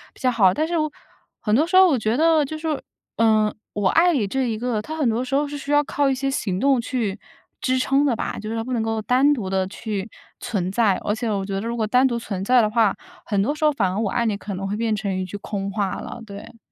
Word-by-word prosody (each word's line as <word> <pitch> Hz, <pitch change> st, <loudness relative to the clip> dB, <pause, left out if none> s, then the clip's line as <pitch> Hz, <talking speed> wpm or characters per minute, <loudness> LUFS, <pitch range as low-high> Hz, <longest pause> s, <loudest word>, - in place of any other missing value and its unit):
比 -, -, -19 dB
较 255 Hz, -1 st, +2 dB
好。 195 Hz, -6 st, +4 dB
但 310 Hz, +1 st, 0 dB
是 345 Hz, -, -4 dB, 0.7 s
很 210 Hz, -2 st, -1 dB
多 310 Hz, +5 st, +3 dB
时 370 Hz, +1 st, +3 dB
候 375 Hz, 0 st, +8 dB
我 275 Hz, -8 st, +2 dB
觉 220 Hz, +3 st, 0 dB
得 320 Hz, -1 st, +4 dB
就 310 Hz, +3 st, -5 dB
是 -, -, -12 dB
说， 310 Hz, -3 st, -1 dB, 0.4 s
呃， 215 Hz, -2 st, +3 dB, 0.2 s
我 205 Hz, -2 st, 0 dB
爱 350 Hz, +2 st, +4 dB
你 230 Hz, -8 st, +1 dB
这 260 Hz, +2 st, -1 dB
一 220 Hz, -, -2 dB
个， 235 Hz, -2 st, -1 dB
它 315 Hz, +7 st, -6 dB
很 290 Hz, -6 st, +1 dB
多 230 Hz, +2 st, 0 dB
时 265 Hz, +2 st, -2 dB
候 290 Hz, +1 st, +1 dB
是 290 Hz, -, -6 dB
需 280 Hz, +1 st, -6 dB
要 290 Hz, 0 st, +4 dB
靠 285 Hz, -1 st, 0 dB
一 265 Hz, -, +1 dB
些 270 Hz, +1 st, -1 dB
行 190 Hz, -7 st, -2 dB
动 270 Hz, -3 st, +3 dB
去 225 Hz, -5 st, -2 dB, 0.4 s
支 255 Hz, 0 st, +1 dB
撑 270 Hz, +2 st, +2 dB
的 250 Hz, -5 st, +2 dB
吧。 -, -, -4 dB
就 215 Hz, +1 st, -6 dB
是 225 Hz, -, -3 dB
它 225 Hz, -, -2 dB
不 255 Hz, +1 st, -4 dB
能 230 Hz, -, 0 dB
够 225 Hz, 0 st, -1 dB
单 260 Hz, +6 st, +3 dB
独 220 Hz, -9 st, -3 dB
地 190 Hz, -1 st, 0 dB
去 210 Hz, 0 st, -5 dB, 0.3 s
存 190 Hz, -6 st, -2 dB
在， 205 Hz, -3 st, +3 dB
而 205 Hz, -, 0 dB
且 230 Hz, 0 st, -3 dB
我 195 Hz, -2 st, -1 dB
觉 195 Hz, -, -5 dB
得 195 Hz, -, -1 dB
如 235 Hz, -, -2 dB
果 220 Hz, -, 0 dB
单 255 Hz, +4 st, +4 dB
独 235 Hz, -2 st, -1 dB
存 195 Hz, -4 st, -5 dB
在 250 Hz, +3 st, +5 dB
的 215 Hz, -, +1 dB
话， 220 Hz, -2 st, +2 dB, 0.3 s
很 200 Hz, -3 st, 0 dB
多 285 Hz, -, 0 dB
时 310 Hz, -, -6 dB
候 300 Hz, -, +5 dB
反 190 Hz, -8 st, 0 dB
而 200 Hz, -, -2 dB
我 210 Hz, -3 st, 0 dB
爱 235 Hz, +2 st, 0 dB
你 210 Hz, -2 st, 0 dB
可 205 Hz, -1 st, -6 dB
能 195 Hz, +1 st, -4 dB
会 205 Hz, -, -2 dB
变 225 Hz, -1 st, 0 dB
成 200 Hz, -2 st, -2 dB
一 185 Hz, -, -2 dB
句 185 Hz, -, -8 dB
空 200 Hz, -1 st, -4 dB
话 200 Hz, -2 st, -1 dB
了， 235 Hz, -, -8 dB
对。 200 Hz, +2 st, -11 dB
230 Hz, 305 characters per minute, -22 LUFS, 205-270 Hz, 0.7 s, 候